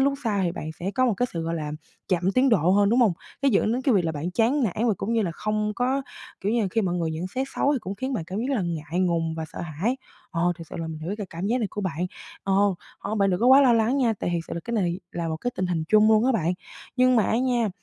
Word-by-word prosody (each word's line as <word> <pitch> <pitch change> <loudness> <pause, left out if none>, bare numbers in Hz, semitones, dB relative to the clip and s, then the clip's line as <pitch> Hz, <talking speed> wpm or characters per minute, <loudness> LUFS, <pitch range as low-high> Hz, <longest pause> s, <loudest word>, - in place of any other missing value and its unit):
lúc 275 +1 +3
sai 205 -3 +1
thì 170 - 0
bạn 155 -3 -5
sẽ 185 - -2
có 255 0 +3
một 230 - +2
cái 245 +6 0
sự, 165 -1 -3
gọi 165 +1 -2
là, 150 -2 -4 0.4
chậm 185 +1 +1
tiến 260 +4 +4
độ 180 -7 +3
hơn, 200 +1 +4
đúng 235 +4 +3
hông? 220 -7 +5 0.3
Nó 280 - +4
dẫn 215 -1 +2
đến 250 +2 -1
cái 260 -3 +3
việc 185 -4 +3
là 160 - 0
bạn 155 +4 -3
chán 240 +8 +2
nản 220 +3 0
và 220 - +3
cũng 210 +6 -2
như 230 - +2
là 180 - -1
không 215 +3 -1
có, 260 +3 0 0.4
kiểu, 205 - 0
như 235 - +2
là - - +1
khi 225 - +1
mọi 180 -3 0
người 165 -2 -1
nhận 160 +3 -3
xét 260 +8 -3
xấu 285 - +3
thì 280 - +1
cũng 195 0 -5
khiến 260 +5 -3
bạn 200 -10 -2
cảm 185 +4 -5
giác 265 +4 -1
là 200 - 0
ngại 165 0 -2
ngùng 165 -3 +1
và 160 0 -4
sợ - - -6
hãi. 175 - -2 0.3
Ờ, 175 0 +1
thiệt 165 - -9
sự - - -6
là 165 - -3
mình 160 -1 -6
hiểu 170 +6 -4
cái 205 - -4
cảm 170 +3 -4
giác 240 +4 +1
này 225 - 0
của 210 - -4
bạn. 180 -2 -2 0.4
Ờ, 195 - 0 0.5
ờ, 210 - -4
bạn 200 -2 +2
đừng 180 - 0
có 240 - +3
quá 265 +2 +8
lo 255 - +5
lắng 230 +3 +2
nha, 245 -5 +3
tại - - -1
thiệt 170 - 0
sự - - -4
là 170 - -3
cái 235 - -5
này 180 -3 0
là 170 -1 -3
một 160 - -2
cái 245 - -2
tình 185 - 0
hình 165 -3 -1
chung 215 0 +5
luôn 220 +1 +5
á 265 - +3
bạn. 175 -7 +1 0.4
Nhưng 255 -1 +4
mà 220 - +5
á 225 - +1
nha, 245 -3 +1
200 Hz, 315 wpm, -25 LUFS, 170-240 Hz, 0.5 s, quá